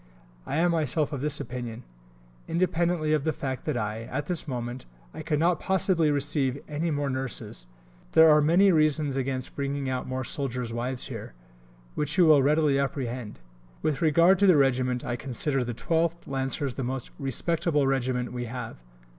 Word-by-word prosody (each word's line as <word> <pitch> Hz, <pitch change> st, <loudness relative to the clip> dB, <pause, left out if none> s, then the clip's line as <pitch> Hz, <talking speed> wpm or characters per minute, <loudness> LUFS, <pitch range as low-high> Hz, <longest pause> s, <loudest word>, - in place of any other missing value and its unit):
I -, -, -2 dB
am 170 Hz, +2 st, +3 dB
myself 155 Hz, -2 st, 0 dB
of 135 Hz, -, -3 dB
this 150 Hz, 0 st, -1 dB
opinion. 120 Hz, -1 st, -6 dB, 0.6 s
Independently 170 Hz, -2 st, +1 dB
of 150 Hz, -3 st, +1 dB
the 160 Hz, -, +1 dB
fact 130 Hz, -4 st, -5 dB
that, 150 Hz, -, -1 dB
at 115 Hz, +6 st, -3 dB
this 175 Hz, -2 st, -3 dB
moment, 125 Hz, -1 st, -5 dB, 0.3 s
I -, -, -7 dB
could 155 Hz, -1 st, -1 dB
not 170 Hz, +2 st, +2 dB
possibly 185 Hz, -4 st, +2 dB
receive 140 Hz, -2 st, 0 dB
any 155 Hz, +3 st, -2 dB
more 145 Hz, -2 st, -1 dB
nurses, 130 Hz, -, -5 dB, 0.5 s
there 160 Hz, 0 st, +8 dB
are 150 Hz, -1 st, +6 dB
many 175 Hz, +6 st, +5 dB
reasons 155 Hz, -3 st, +2 dB
against 130 Hz, -1 st, -3 dB
bringing 140 Hz, 0 st, -2 dB
out 130 Hz, -1 st, -3 dB
more 130 Hz, 0 st, -3 dB
soldiers' 125 Hz, -3 st, -3 dB
wives 125 Hz, +2 st, -3 dB
here, -, -, -8 dB, 0.6 s
which 150 Hz, +3 st, -2 dB
you 180 Hz, -, +6 dB
will 155 Hz, -3 st, +6 dB
readily 145 Hz, 0 st, +3 dB
apprehend. 130 Hz, -6 st, -3 dB, 0.5 s
With 150 Hz, -3 st, 0 dB
regard 170 Hz, +4 st, +5 dB
to 200 Hz, -, +5 dB
the 180 Hz, -5 st, +6 dB
Regiment, 130 Hz, -2 st, +1 dB
I 120 Hz, -, -2 dB
consider 135 Hz, +1 st, -1 dB
the 120 Hz, -1 st, -4 dB
12th 165 Hz, +5 st, 0 dB
Lancers 135 Hz, 0 st, -2 dB
the 135 Hz, -, -4 dB
most 130 Hz, 0 st, -4 dB
"respectable" 150 Hz, +2 st, +1 dB
Regiment 130 Hz, -2 st, -1 dB
we 120 Hz, -1 st, -3 dB
have. 125 Hz, +2 st, -6 dB
140 Hz, 170 wpm, -27 LUFS, 130-155 Hz, 0.6 s, there